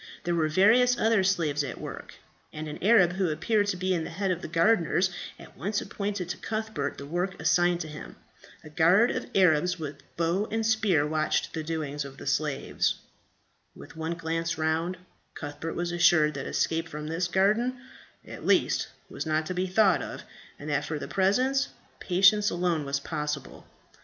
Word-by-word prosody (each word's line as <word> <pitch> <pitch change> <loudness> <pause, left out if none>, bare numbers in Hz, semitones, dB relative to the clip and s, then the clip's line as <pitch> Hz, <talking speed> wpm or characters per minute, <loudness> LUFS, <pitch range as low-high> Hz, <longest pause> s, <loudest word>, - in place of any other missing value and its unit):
There 175 - -1
were 160 -2 +2
various 230 +9 +4
other 225 -4 +3
slaves 165 -7 +1
at 140 - -6
work; - - -8 0.4
and 155 0 -6
an 150 - -7
Arab, 195 -4 +5
who 190 -1 0
appeared 205 +7 +1
to 185 - -1
be 185 +1 0
the 165 -2 -3
head 195 -1 -1
of 175 -1 -2
the - - -5
gardeners, 175 +1 +2 0.3
at - - -14
once 205 +2 -2
appointed 200 -3 -4
to - - -3
Cuthbert 215 -10 -3
the 140 - -7
work 175 +5 -3
assigned 175 0 +2
to 160 - -5
him. 155 0 -9 0.5
A 155 - -11
guard 180 +10 +4
of - - -4
Arabs 180 -1 +3
with 145 -3 -7 0.2
bow 170 +5 0
and 225 0 -1
spear 215 -9 +2
watched 155 0 0
the 160 - -3
doings 150 -2 -3
of 140 -1 -10
the - - -10
slaves. - - 0 0.8
With - - -13
one 160 +1 -3
glance 165 0 -2
round, 160 +3 -1 0.4
Cuthbert 145 +2 -6
was 175 0 -2
assured 175 -3 +4
that 135 -1 -5
escape 165 +1 -1
from 150 0 -6
this 165 +3 -1
garden, 215 +8 +2 0.5
at - - -9
least, - - +2 0.2
was - - -6
not 155 0 +1
to 185 - -3
be 185 +1 -1
thought 190 0 +3
of, - - -7 0.3
and 145 - -9
that 145 0 0
for 155 +1 -3
the - - -6
present, 255 +8 +2 0.3
patience 200 +3 +4
alone 175 -4 -1
was 140 0 -1
possible. 150 -1 -5
175 Hz, 180 wpm, -27 LUFS, 155-195 Hz, 0.8 s, Arab